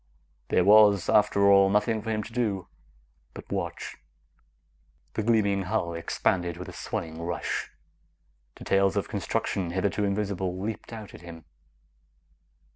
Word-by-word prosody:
There 90 - +3
was, 105 -2 +6
after 105 -2 +4
all, 100 0 +6
nothing 105 +2 +1
for 110 - -6
him 110 -1 -1
to 115 - -11
do 105 -7 -1 0.7
but - - -11
watch. - - -4 1.2
The - - -1
gleaming 105 -3 +2
hull 85 -2 -1
expanded 85 +1 -1
with 90 - -7
a - - -9
swelling 80 0 -5
rush. 85 +1 -3 0.9
Details 95 0 +1
of - - -1
construction, 90 -3 -2
hitherto 95 +3 -1
invisible, 100 -2 -2
leaped 110 +4 -5
out 110 -3 -9
at - - -12
him. 85 -2 -11
100 Hz, 130 wpm, -27 LUFS, 90-105 Hz, 1.2 s, was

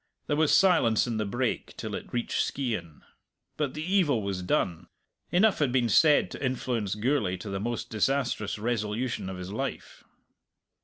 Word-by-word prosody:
There 145 - 0
was 155 0 +3
silence 165 - +4
in 120 -3 -2
the 110 -1 -1
brake 120 +3 -2
till - - -5
it - - -6
reached 120 -1 -1
Skeighan. 110 - -3 0.5
But 150 -3 -2
the 155 - -4
evil 165 - +2
was 95 -2 -3
done. 90 -1 -1 0.4
Enough 205 +4 +4
had 145 -5 +2
been 125 -2 +2
said 150 - +5
to - - -7
influence 120 -6 -1
Gourlay 105 -5 0
to 95 +3 -7
the 95 - -2
most 120 +3 -3
disastrous 115 -2 0
resolution 110 -1 -2
of 95 - -6
his 90 +1 -7
life. 135 +4 -5
120 Hz, 165 wpm, -28 LUFS, 105-140 Hz, 0.5 s, said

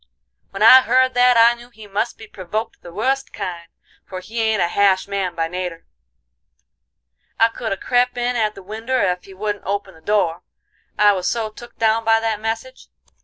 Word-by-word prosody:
"When 195 +2 -3
I 255 +4 +9
heard 255 0 +2
that, 245 0 +4
I 230 +1 +6
knew 240 0 -14
he 220 -3 -14
must 205 +4 -3
be 220 - -11
provoked 210 +2 -6
the 175 - -11
wust 265 +8 -1
kind, 170 -2 -6 0.4
for 185 - -8
he 225 +5 -5
ain't 220 -2 +1
a - - +2
hash 190 +1 +2
man 195 -3 -3
by 165 -1 -1
nater. 180 -1 -5 1.5
I 225 - +5
could 225 0 -5
have 195 - -4
crep' 245 0 +1
in 245 +1 -1
at 215 -2 0
the 195 - -11
winder 225 +6 -3
ef 180 -4 0
he 195 - -13
wouldn't 205 +1 -4
open 200 0 -3
the 160 - -19
door, 175 -3 0 0.6
I 210 0 +6
was 185 -2 -1
so 225 -2 -2
took 240 +2 -13
down 225 0 +2
by 225 0 +3
that 225 -2 -2
message. 225 +4 -5
215 Hz, 195 wpm, -20 LUFS, 190-235 Hz, 1.5 s, I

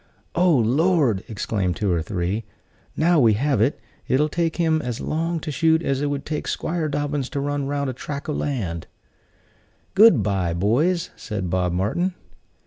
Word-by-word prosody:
"Oh, 175 -1 +4
Lord!" 130 - +2
exclaimed 100 -4 -2
two 100 0 0
or 85 -2 +1
three: 95 +4 -2 0.5
"now 165 +1 +4
we 115 -5 +5
have 130 +1 +1
it. 130 +6 +1 0.3
It'll 150 +4 +2
take 165 +1 -1
him 160 -2 +2
as 125 -4 -4
long 165 +2 -1
to 150 - -4
shoot 160 +2 +2
as 135 -2 0
it 145 - 0
would 145 -1 -3
take 150 -1 -3
'Squire 165 -2 -2
Dobbins 145 -2 -2
to 145 - -3
run 145 0 -2
round 140 0 -1
a 130 - -2
track 140 +3 -6
o' 150 - -1
land." 100 - -3 1.1
"Good 195 - +6
by, 95 -4 0
boys," 150 - +1
said 95 -5 -4
Bob 90 -1 +1
Martin. 170 - 0
140 Hz, 170 wpm, -23 LUFS, 105-160 Hz, 1.1 s, Good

